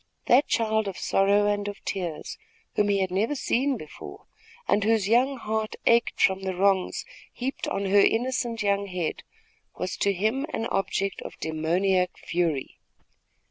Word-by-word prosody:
That 260 +5 +5
child 220 -2 +1
of 195 - -5
sorrow 200 +1 +3
and 205 0 0
of 205 - -6
tears, 175 -5 -4 0.3
whom 205 0 +2
he 200 -1 +2
had 190 -1 -1
never 215 +10 0
seen 265 0 0
before, 155 -7 -10 0.4
and 205 - +2
whose 220 -2 +2
young 255 +5 +3
heart 220 -2 -2
ached 235 0 +3
from 190 0 +3
the 190 -1 -3
wrongs 190 0 +1 0.3
heaped 260 +2 -4
on 200 - -2
her 200 +1 +4
innocent 235 +1 +1
young 200 0 +1
head, 180 -4 -3 0.6
was 180 +1 -3
to 200 - +2
him 220 - 0
an 225 - -2
object 195 -1 -1
of - - -9
demoniac 180 +4 0
fury. 165 -6 -2
200 Hz, 155 wpm, -26 LUFS, 190-225 Hz, 0.6 s, That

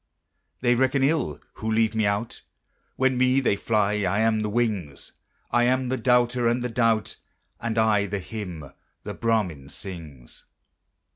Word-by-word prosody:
They 120 -1 +3
reckon 130 +2 +2
ill 140 - +1 0.2
who 110 0 -3
leave 110 0 +2
me 110 -2 +1
out; 100 +3 -2 0.5
When 130 -1 +1
me 130 +1 +4
they 125 -6 +2
fly, 105 0 +1
I 100 +2 +1
am 110 -1 +2
the 105 0 -1
wings; 105 - -2 0.4
I 120 0 +3
am 130 0 +1
the 130 - 0
doubter 125 -1 +2
and 120 +1 +1
the 125 - -2
doubt, 115 -2 +1 0.4
And 115 -1 -3
I 105 -2 +3
the 100 - -2
hymn 90 -8 -7 0.3
the - - -5
Brahmin 95 -12 -1
sings. 75 -9 -10
110 Hz, 155 wpm, -25 LUFS, 100-125 Hz, 0.5 s, me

